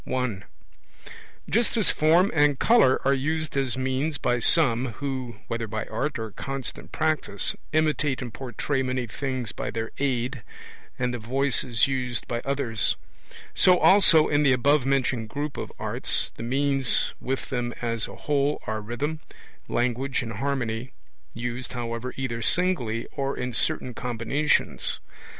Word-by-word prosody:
I. 125 -7 -1 1.1
Just 235 +2 +1
as 215 - +4
form 170 +5 +4
and 145 -3 +4
colour 220 - +5
are 135 - +4
used 155 +3 -1
as 135 -2 0
means 130 +4 -1
by 120 -1 +1
some, 125 -4 +4
who 130 -3 -4
(whether 115 -1 -3
by 110 +1 -3
art 150 +2 -2
or 110 -1 -5
constant 135 +5 -6
practice) 155 -10 0 0.2
imitate 155 -3 +1
and 120 -3 -6
portray 135 +1 -2
many 130 -1 -1
things 130 -1 -3
by - - -4
their 115 0 -4
aid, 130 -2 -1 0.6
and 125 -1 -1
the 120 - -3
voice 135 +4 0
is 120 -4 +2
used 125 -3 -2
by 120 0 -2
others; 135 -5 0 0.6
so 180 -1 +6
also 185 -5 +6
in 145 0 +2
the 140 -3 +5
above 135 +2 +3
mentioned 130 -4 0
group 145 +3 -4
of - - -5
arts, - - -1
the - - -9
means 135 +1 +2
with 135 +2 -3
them 120 -2 -1
as 115 -2 -1
a - - -10
whole 145 0 0
are 110 -1 -3
rhythm, 140 +9 -3 0.5
language, 125 +3 0
and 115 -1 -5
harmony 125 -2 -2 0.4
used, 120 +2 -4
however, 120 0 -4
either 120 -3 -3
singly 120 -7 +1
or 140 -1 -2
in 125 0 -3
certain 125 +2 +1
combinations. 125 +6 0
130 Hz, 150 wpm, -26 LUFS, 120-145 Hz, 1.1 s, so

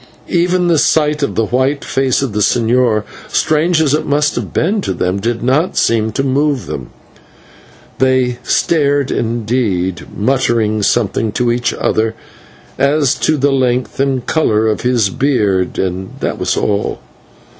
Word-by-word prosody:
Even 180 +1 +1
the 165 -3 +3
sight 150 -1 +2
of 140 - -1
the 115 - +1
white 130 +5 0
face 135 0 0
of 130 -6 -3
the 105 - -1
señor, 115 0 +2 0.2
strange 160 +2 +1
as 150 -3 +2
it 150 - +1
must 150 +1 +1
have - - -4
been 200 +6 0
to 95 - -2
them, 90 +3 -1
did 115 +2 -2
not 145 +8 +1
seem 110 -1 +1
to 135 - -1
move 140 0 0
them. - - -6 1.1
They 130 -2 +1
stared 145 -4 +1
indeed, 110 -6 -1
muttering 110 -2 +1
something 110 0 0
to 120 +1 +1
each 120 0 0
other 110 +1 0 0.6
as 140 -1 +2
to 155 - +1
the 140 +1 +2
length 125 -3 0
and 135 -2 0
colour 110 -9 +1
of 110 - -1
his 120 -6 +1
beard, 105 -10 0
and 95 0 -3
that - - -3
was - - -1
all. 100 0 -1
125 Hz, 155 wpm, -15 LUFS, 110-145 Hz, 1.1 s, the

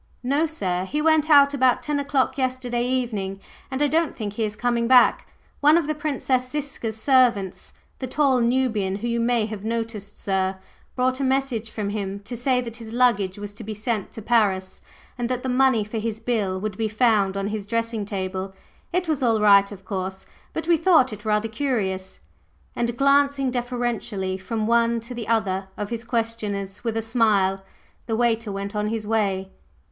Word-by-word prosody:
"No, 285 +6 +2
sir. 185 - -2
He 295 +10 -2
went 315 0 +3
out 285 -1 +7
about 260 -3 +3
ten 295 -1 -1
o'clock 270 -2 0
yesterday 250 -2 -1
evening, 215 -7 -2 0.3
and 265 +2 -1
I - - +4
don't 325 +2 +1
think 210 -3 -4
he 225 - -2
is 210 -1 -2
coming 235 +1 0
back. 250 -1 +5 0.3
One 300 +3 +6
of 340 - +1
the 310 - -1
Princess 275 -4 -1
Ziska's 270 -6 -4
servants 240 -7 +2 0.3
the 260 - -3
tall 265 -1 +2
Nubian 235 -6 +1
whom 235 +4 -3
you 235 - 0
may 235 -1 +2
have 215 -2 -6
noticed, 225 -2 -4
sir 190 -1 0 0.4
brought 255 +1 +1
a - - -1
message 260 -4 0
from 210 -2 -3
him 200 -1 -3
to 230 +4 -7
say 250 +1 +1
that 230 -2 -7
his 225 -2 -9
luggage 220 -7 +2
was 205 0 -7
to 225 +2 -9
be 215 0 -5
sent 215 -1 -2
to 220 - -8
Paris, 195 -5 +1 0.4
and 240 0 -1
that 255 -1 -2
the 260 - -2
money 255 -3 +3
for 215 +2 -4
his 220 0 -3
bill 215 -5 -1
would 205 0 -4
be 225 - 0
found 215 -3 +2
on 195 +1 -2
his 210 -2 -4
dressing 230 -1 -1
table. 190 -1 -4 0.4
It 360 0 0
was 305 -3 0
all 230 -3 +3
right, 200 -1 +5
of 195 -2 -11
course, 190 0 -4 0.3
but 320 - -4
we 340 -1 +5
thought 320 - +4
it 210 +1 -10
rather 210 +1 +1
curious." 210 -7 -2 0.6
And 235 0 -1
glancing 275 -1 +3
deferentially 240 -6 -2
from 215 +3 -3
one 235 0 +3
to 235 +2 -8
the 235 -3 -6
other 195 -4 0
of 205 +1 -4
his 230 -1 -3
questioners 220 -4 -3
with 225 -2 -1
a 225 - -1
smile, 205 -4 +2 0.4
the 225 -1 -1
waiter 230 -2 +1
went 200 +1 -5
on 210 0 0
his 220 -1 -3
way. 195 -3 0
230 Hz, 190 wpm, -24 LUFS, 205-255 Hz, 0.6 s, out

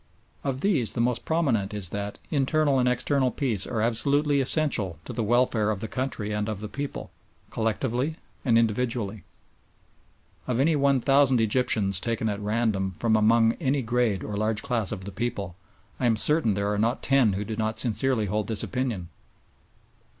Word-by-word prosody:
Of 135 -1 -2
these 155 - +1
the - - -4
most 120 0 0
prominent 120 -12 0
is 100 -4 0
that 100 +1 -5
internal 145 -1 +2
and 125 0 +3
external 130 +2 +1
peace 115 -6 -1
are 110 - -2
absolutely 140 +6 +1
essential 125 - +2
to - - -6
the 120 - -2
welfare 115 -1 +2
of 105 -3 -1
the 110 - -4
country 125 -4 -3
and 105 +1 -2
of 105 -3 -3
the 105 - -5
people, 140 +6 -6 0.4
collectively 120 +6 -1 0.3
and 115 -4 +3
individually. 115 -2 -1 1.2
Of 125 -1 0
any 155 +4 +3
one 140 -2 +2
thousand 135 -1 +4
Egyptians 110 -4 +2
taken 115 0 -2
at 100 -1 -3
random 105 -2 0
from 110 +5 0
among 115 +1 +4
any 135 -2 +1
grade 115 -4 0
or 105 - -5
large 110 +1 -1
class 120 -8 -1
of 95 - -5
the 100 - -6
people, 100 -3 -3 0.5
I 125 - +1
am 115 - +3
certain 150 -4 +2
there 100 +1 -1
are 105 - -1
not 115 +3 0
ten 135 -7 +3
who 100 +2 -3
do 110 +1 -4
not 110 0 -2
sincerely 115 0 +1
hold 105 +1 -2
this 110 -2 0
opinion. 120 -10 -3
115 Hz, 175 wpm, -26 LUFS, 105-130 Hz, 1.2 s, thousand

